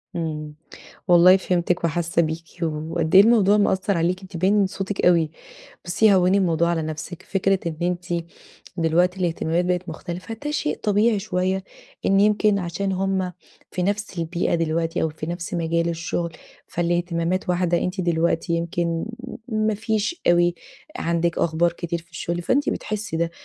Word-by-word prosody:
إمم، 155 Hz, -3 st, -4 dB, 0.5 s
والله 180 Hz, +1 st, +7 dB
فهمتِك 180 Hz, -1 st, 0 dB
وحاسة 170 Hz, +1 st, +1 dB
بيكِ، 160 Hz, +1 st, -3 dB, 0.2 s
وقد 160 Hz, +1 st, -1 dB
إيه 195 Hz, -, +11 dB
الموضوع 210 Hz, -2 st, +5 dB
مأثر 190 Hz, -2 st, +1 dB
عليكِ 175 Hz, +3 st, 0 dB
أنتِ 190 Hz, -2 st, -8 dB
باين 190 Hz, +4 st, +2 dB
من 205 Hz, -2 st, +4 dB
صوتِك 195 Hz, +1 st, -3 dB
أوي، 165 Hz, -3 st, +4 dB, 0.5 s
بصي 200 Hz, +4 st, +4 dB
هوني 185 Hz, +1 st, +4 dB
الموضوع 170 Hz, -3 st, +2 dB
على 170 Hz, -2 st, 0 dB
نفسِك، 155 Hz, +3 st, -6 dB
فكرة 195 Hz, 0 st, +1 dB
إن 165 Hz, -2 st, -2 dB
أنتِ 175 Hz, -1 st, -2 dB, 0.5 s
دلوقتي 175 Hz, +3 st, +2 dB
الاهتمامات 170 Hz, 0 st, 0 dB
بقت 180 Hz, 0 st, -1 dB
مختلفة 175 Hz, +7 st, -6 dB
ده 295 Hz, -, -1 dB
شيء 300 Hz, 0 st, -1 dB
طبيعي 210 Hz, +1 st, +3 dB
شوية 190 Hz, -1 st, -1 dB, 0.4 s
إن 195 Hz, 0 st, +4 dB
يمكن 210 Hz, 0 st, +3 dB
عشان 190 Hz, +2 st, -2 dB
هم 190 Hz, -1 st, -1 dB, 0.4 s
في 180 Hz, -, -2 dB
نفس 200 Hz, -1 st, -2 dB
البيئة 170 Hz, +1 st, -1 dB
دلوقتي 165 Hz, 0 st, 0 dB
أو 160 Hz, -, +2 dB
في 155 Hz, 0 st, -7 dB
نفس 175 Hz, +1 st, -4 dB
مجال 170 Hz, 0 st, 0 dB
الشغل، 170 Hz, 0 st, -2 dB, 0.3 s
فالاهتمامات 175 Hz, +1 st, -1 dB
واحدة 175 Hz, -1 st, +2 dB
أنتِ 180 Hz, +2 st, -2 dB
دلوقتي 170 Hz, -1 st, 0 dB
يمكن 170 Hz, 0 st, -1 dB, 0.4 s
ما 215 Hz, -2 st, +1 dB
فيش 220 Hz, -, -2 dB
أوي 175 Hz, 0 st, +4 dB, 0.4 s
عندِك 170 Hz, 0 st, 0 dB
أخبار 170 Hz, +1 st, +2 dB
كتير 170 Hz, 0 st, -4 dB
في 170 Hz, -, -30 dB
الشغل، 170 Hz, +2 st, -3 dB
فأنتِ 275 Hz, +10 st, +1 dB
بتحسي 215 Hz, -4 st, -4 dB
ده. 165 Hz, 0 st, 0 dB
175 Hz, 155 wpm, -23 LUFS, 170-195 Hz, 0.5 s, إيه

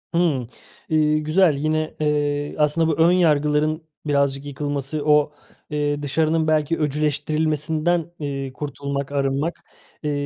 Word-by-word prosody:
Hımm. 155 Hz, -8 st, +1 dB, 0.4 s
Eee, 155 Hz, -1 st, +3 dB
güzel, 155 Hz, +1 st, +3 dB
yine, 155 Hz, +2 st, -1 dB
eee, 145 Hz, -1 st, 0 dB
aslında 150 Hz, +2 st, +2 dB
bu 160 Hz, -, +1 dB
ön 165 Hz, +1 st, +5 dB
yargıların 155 Hz, -2 st, +2 dB, 0.2 s
birazcık 140 Hz, -1 st, +1 dB
yıkılması, 145 Hz, +1 st, -3 dB
o, 150 Hz, 0 st, +4 dB, 0.4 s
eee, 145 Hz, -1 st, -1 dB
dışarının 155 Hz, +2 st, +1 dB
belki 155 Hz, +1 st, +1 dB
öcüleştirilmesinden, 155 Hz, +3 st, 0 dB
eee, 135 Hz, -3 st, -4 dB
kurtulmak, 140 Hz, 0 st, -4 dB
arınmak, 140 Hz, +4 st, -1 dB, 0.4 s
eee, 150 Hz, -, 0 dB
150 Hz, 115 wpm, -22 LUFS, 145-155 Hz, 0.4 s, ön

